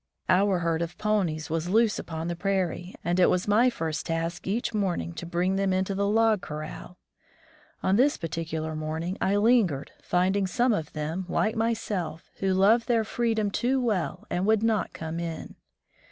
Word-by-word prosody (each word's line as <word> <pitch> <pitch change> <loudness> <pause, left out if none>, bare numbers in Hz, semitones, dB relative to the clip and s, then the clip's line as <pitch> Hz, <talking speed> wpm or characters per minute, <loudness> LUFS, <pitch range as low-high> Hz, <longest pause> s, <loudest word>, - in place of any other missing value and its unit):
Our 195 0 +4
herd 165 -1 0
of 170 +1 -4
ponies 175 -8 0
was 165 +1 -1
loose 220 +2 +3
upon 160 0 -5
the 175 - -2
prairie, 185 -1 -2
and 175 +2 0
it 180 - +6
was 180 +2 0
my 225 +5 +5
first 160 -9 -3
task 165 +2 -3
each 230 +4 -1
morning 190 -5 -1
to 170 0 -7
bring 180 +2 0
them 195 -1 +1
into 190 +1 0
the 200 +1 0
log 220 -1 +3
corral. 155 +4 -7 0.9
On 190 +2 +3
this 275 +4 +3
particular 160 -1 -4
morning 160 +4 -3
I 195 - +2
lingered, 205 - +2
finding 190 +2 +1
some 240 +6 +2
of 160 -7 -3
them, 160 +4 -3
like 215 - +1
myself, 205 -8 -2
who 195 -1 +1
loved 220 +5 +4
their 230 -2 +3
freedom 220 -2 0
too 255 +5 +1
well 215 -9 -1
and 180 +3 0
would 220 0 +3
not 220 -4 +1
come 160 +1 -5
in. 165 -2 -5
185 Hz, 175 wpm, -27 LUFS, 165-215 Hz, 0.9 s, it